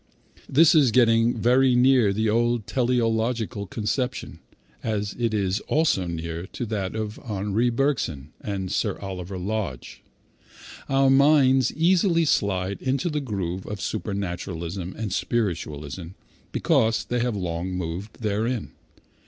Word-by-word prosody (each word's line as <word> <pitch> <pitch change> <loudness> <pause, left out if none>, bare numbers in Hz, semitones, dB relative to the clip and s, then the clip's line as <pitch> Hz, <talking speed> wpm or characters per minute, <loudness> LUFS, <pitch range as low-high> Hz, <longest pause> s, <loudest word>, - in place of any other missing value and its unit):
This 160 +4 +6
is 150 -6 +5
getting 115 0 +3
very 125 +3 +4
near 125 -2 +5
to 100 - +1
the 110 +1 +1
old 120 0 +1
teleological 115 -3 0
conception, 120 +4 -3 0.4
as 105 -2 -2
it 115 -2 +1
is 100 -2 0
also 150 - +2
near 85 +1 -5
to 120 - -3
that 105 -3 -3
of 110 -1 -4
Henri 105 +2 -1
Bergson 115 - -1
and 95 -3 -4
Sir - - 0
Oliver 95 -1 -6
Lodge. 95 - -4 0.9
Our 135 0 +4
minds 135 -2 +5
easily 170 0 +3
slide 100 -7 0
into 140 +6 0
the 150 -1 -1
groove 95 -7 -4
of 105 -1 -5
supernaturalism 90 -3 -4
and 110 -4 -3
spiritualism 85 -9 -2 0.4
because 110 0 +2
they 125 - -1
have 120 -2 0
long 90 -1 -3
moved 90 +6 -5
therein. 110 +3 -1
110 Hz, 130 wpm, -25 LUFS, 95-125 Hz, 0.9 s, This